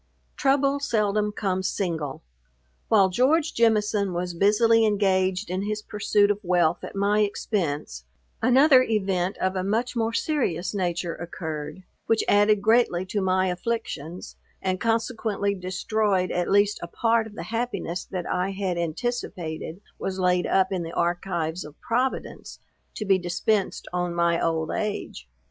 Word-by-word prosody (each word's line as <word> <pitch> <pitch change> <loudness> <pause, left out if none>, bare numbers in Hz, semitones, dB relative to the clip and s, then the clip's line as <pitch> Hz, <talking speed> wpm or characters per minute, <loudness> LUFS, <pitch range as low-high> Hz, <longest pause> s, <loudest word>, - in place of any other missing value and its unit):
Trouble 275 0 +2
seldom 210 -5 0
comes 190 -2 -1
single. 160 -8 -3 0.6
While 200 -4 +5
George 290 - +2
Jemison 210 -4 +2
was 175 0 -3
busily 225 +5 +4
engaged 195 -2 +1
in 185 +1 -1
his 210 +1 -3
pursuit 205 -1 +2
of 205 - -2
wealth 175 -3 +1
at - - -7
my 200 +1 +2
expence, 155 - -2 0.4
another 260 +2 +6
event 195 -5 0
of 190 0 -1
a 185 - -1
much 225 +6 -1
more 225 -1 0
serious 205 - -1
nature 175 -3 -1
occurred, 160 -1 -6 0.2
which 225 - +2
added 205 0 +4
greatly 220 -5 +3
to 200 +2 -2
my 185 0 +2
afflictions, 180 -4 -4 0.2
and 185 -1 -1
consequently 225 -3 0
destroyed, 190 +1 -1
at 175 0 -1
least 205 +1 +3
a 170 - -5
part 225 +4 +1
of 210 - -13
the - - -5
happiness 200 -7 -2
that 180 -2 -5
I 180 +2 -1
had 190 -3 -2
anticipated 170 -3 -4 0.2
was 190 -1 -3
laid 180 -1 +2
up 190 0 +2
in 185 -2 -1
the 165 0 -6
archives 175 -1 -1
of 150 0 -13
Providence, 250 +3 -2 0.4
to 215 - -4
be 195 -1 +3
dispensed 180 +4 -1
on 175 -1 -1
my 170 0 +2
old 160 -1 0
age. 205 - -4
195 Hz, 145 wpm, -25 LUFS, 175-220 Hz, 0.6 s, another